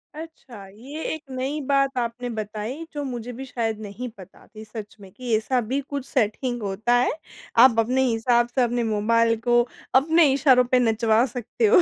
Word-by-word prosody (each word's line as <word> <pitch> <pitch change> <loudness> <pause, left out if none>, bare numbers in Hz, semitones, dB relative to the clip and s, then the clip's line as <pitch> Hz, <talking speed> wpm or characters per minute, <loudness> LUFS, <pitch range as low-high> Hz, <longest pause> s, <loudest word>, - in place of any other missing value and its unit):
अच्छा, 300 -10 -10
ये 255 +11 -9
एक 315 -1 -7
नई 265 +3 -3
बात 275 -1 +2
आपने 245 0 -3
बताई 220 +6 -5
जो 290 -1 -3
मुझे 245 -3 -5
भी 265 +3 -7
शायद 225 -4 -3
नहीं 215 +4 -6
पता 190 -1 -15
थी, 215 -2 -12
सच 215 -1 -9
में 195 -2 -13
कि 245 +1 -2
ऐसा 250 +4 0
भी 250 +5 -2
कुछ 280 -1 -6
सेटिंग 240 -1 -1
होता 205 +4 -1
है। 245 +1 +3 0.5
आप 255 -3 +6
अपने 250 +4 +2
हिसाब 240 0 +2
से 260 - +3
अपने 240 0 0
मोबाइल 230 +1 +2
को 240 0 +4 0.3
अपने 320 +5 +5
इशारों 265 -2 +5
पे 255 - +5
नचवा 225 0 +3
सकते 245 - -2
हो। 415 -4 +6
245 Hz, 185 wpm, -24 LUFS, 220-265 Hz, 0.5 s, आप